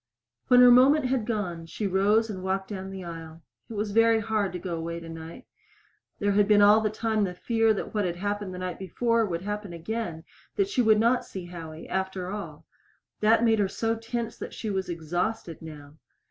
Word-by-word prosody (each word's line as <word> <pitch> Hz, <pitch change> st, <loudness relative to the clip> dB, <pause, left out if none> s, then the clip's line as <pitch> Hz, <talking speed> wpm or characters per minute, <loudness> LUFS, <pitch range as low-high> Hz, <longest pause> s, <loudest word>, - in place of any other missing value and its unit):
When 250 Hz, 0 st, +7 dB
her 250 Hz, 0 st, +9 dB
moment 265 Hz, +4 st, +6 dB
had 250 Hz, -3 st, 0 dB
gone, 180 Hz, -8 st, -3 dB
she 210 Hz, -, -4 dB
rose 200 Hz, +4 st, +3 dB
and 195 Hz, -4 st, -6 dB
walked 190 Hz, +1 st, -2 dB
down 190 Hz, -2 st, -5 dB
the 190 Hz, -1 st, -7 dB
aisle. 165 Hz, -1 st, -9 dB, 0.3 s
It -, -, -7 dB
was 210 Hz, 0 st, -2 dB
very 225 Hz, +1 st, +4 dB
hard 215 Hz, -2 st, -1 dB
to -, -, -3 dB
go 175 Hz, -1 st, -4 dB
away 170 Hz, +1 st, -4 dB
tonight. 165 Hz, 0 st, -9 dB, 0.7 s
There 205 Hz, -1 st, +1 dB
had 200 Hz, 0 st, +3 dB
been 205 Hz, -1 st, +6 dB
all 210 Hz, +2 st, +7 dB
the 215 Hz, -, +1 dB
time 215 Hz, 0 st, 0 dB
the 180 Hz, -2 st, -2 dB
fear 225 Hz, +3 st, +2 dB
that -, -, -5 dB
what 210 Hz, -1 st, +1 dB
happened 205 Hz, +1 st, -3 dB
the 180 Hz, -, -7 dB
night 180 Hz, -1 st, -5 dB
before 230 Hz, +4 st, +1 dB
would 170 Hz, -1 st, -3 dB
happen 205 Hz, -2 st, -4 dB
again 170 Hz, -1 st, -4 dB, 0.3 s
that 395 Hz, -1 st, +1 dB
she 260 Hz, -, +1 dB
would 220 Hz, -2 st, +4 dB
not 235 Hz, +3 st, +3 dB
see 185 Hz, -2 st, -8 dB
Howie, 165 Hz, -2 st, -9 dB
after 190 Hz, -1 st, -3 dB
all. 205 Hz, 0 st, -7 dB, 0.5 s
That 220 Hz, +2 st, +4 dB
made 225 Hz, -2 st, +3 dB
her 200 Hz, -, +3 dB
so 225 Hz, +3 st, -1 dB
tense 230 Hz, +1 st, -4 dB
that -, -, -7 dB
she 220 Hz, -, -4 dB
was 190 Hz, -1 st, -2 dB
exhausted 175 Hz, +2 st, -3 dB
now. 150 Hz, -3 st, -10 dB
205 Hz, 200 wpm, -27 LUFS, 175-225 Hz, 0.7 s, her